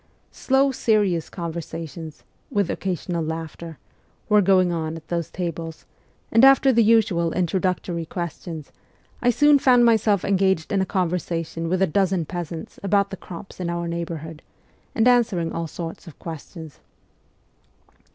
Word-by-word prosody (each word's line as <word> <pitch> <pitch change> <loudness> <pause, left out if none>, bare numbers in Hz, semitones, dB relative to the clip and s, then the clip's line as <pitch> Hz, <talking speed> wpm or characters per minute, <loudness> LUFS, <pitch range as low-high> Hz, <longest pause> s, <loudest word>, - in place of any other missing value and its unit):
Slow, 270 +1 +2
serious 205 -9 +1
con 170 -3 -5
versations, 165 -1 -7 0.3
with 200 -3 0
occasional 175 -2 -3
laughter, 160 0 -6 0.5
were 210 -1 +6
going 185 -2 +4
on 160 -1 -2
at 160 - -13
those 170 -2 -2
tables, 165 -2 -5 0.5
and 230 +3 +5
after 270 0 +7
the 230 - +4
usual 195 -7 +3
introductory 180 -2 -1
questions, 170 -3 -6 0.5
I 245 - +3
soon 290 +4 +5
found 250 -2 +5
myself 215 -4 +3
engaged 190 -4 +1
in 200 -2 +2
a 190 - -1
conversation 165 -2 -2
with 185 +2 +2
a - - +6
dozen 185 -1 +1
peasants 170 -1 -6
about 200 0 +1
the - - -4
crops 180 +3 -10
in 175 -2 -2
our 170 0 -2
neighbourhood, 165 -2 -5 0.5
and 225 +1 +3
answering 230 -9 +2
all 165 0 -3
sorts 165 +2 -7
of 165 - -12
questions. 160 -1 -9
175 Hz, 140 wpm, -23 LUFS, 165-200 Hz, 0.5 s, after